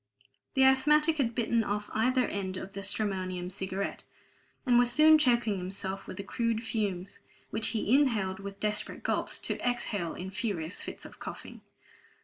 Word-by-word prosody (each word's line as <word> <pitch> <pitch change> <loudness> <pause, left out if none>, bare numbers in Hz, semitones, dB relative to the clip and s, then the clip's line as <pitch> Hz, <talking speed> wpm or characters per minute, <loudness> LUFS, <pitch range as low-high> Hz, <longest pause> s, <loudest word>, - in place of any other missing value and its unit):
The 265 - +5
asthmatic 300 +4 +4
had 235 -4 +1
bitten 235 -1 +1
off 210 0 -3
either 255 +3 +2
end 190 -2 -3
of 190 +1 -7
the 200 - -5
stramonium 185 -3 -1
cigarette, 190 +1 -4 0.6
and 245 -2 +5
was 245 0 +4
soon 310 +3 +7
choking 235 -7 +2
himself 190 +1 -4
with - - -7
the 200 - -4
crude 230 +2 -1
fumes, 200 -5 -3 0.3
which 220 +1 0
he 220 0 0
inhaled 215 -9 +2
in 200 0 -6
desperate 210 0 -2
gulps, - - 0
to - - -2
exhale 215 -8 -1
in 185 +1 -6
furious 195 -6 -3
fits - - -6
of - - -12
coughing. - - -8
210 Hz, 160 wpm, -30 LUFS, 190-245 Hz, 0.6 s, soon